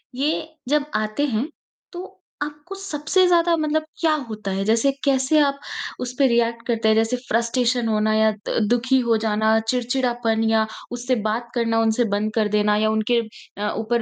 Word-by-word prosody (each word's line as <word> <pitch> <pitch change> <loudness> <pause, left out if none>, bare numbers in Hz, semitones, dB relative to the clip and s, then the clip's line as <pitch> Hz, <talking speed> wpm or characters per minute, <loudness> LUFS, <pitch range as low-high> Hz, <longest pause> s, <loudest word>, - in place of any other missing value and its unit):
ये 300 +4 -1 0.2
जब 295 0 +2
आते 215 +6 0
हैं, 245 0 -1 0.5
तो 360 +2 -9 0.2
आपको 295 +5 -8
सबसे 370 -1 +1
ज़्यादा 340 -1 +3
मतलब 310 0 0 0.2
क्या 320 -2 +3 0.2
होता 215 -2 -5
है? 195 +1 -1
जैसे 230 +6 +3
कैसे 270 +2 +3
आप 280 -1 +2 0.4
उस 250 0 -4
पे 275 - +5
रिएक्ट 235 -1 0
करते 230 -2 0
हैं? 220 - +4
जैसे 225 +3 +1
फ़्रस्ट्रेशन 240 0 0
होना 215 0 +1
या 220 0 +4 0.2
द - - 0
दुखी 250 +2 +2
हो 230 -1 +3
जाना, 220 +1 +2
चिड़चिड़ापन 240 -2 0
या 220 -1 +3 0.3
उससे 245 +1 -1
बात 235 +2 -3
करना 230 -1 +1
उनसे 225 +2 +2
बंद 215 +1 -1
कर 220 -2 +2
देना 210 0 +2
या 215 +1 +2
उनके 220 +2 +1 0.4
अ, 210 +1 -1
ऊपर 230 +2 0
235 Hz, 175 wpm, -22 LUFS, 220-275 Hz, 0.5 s, पे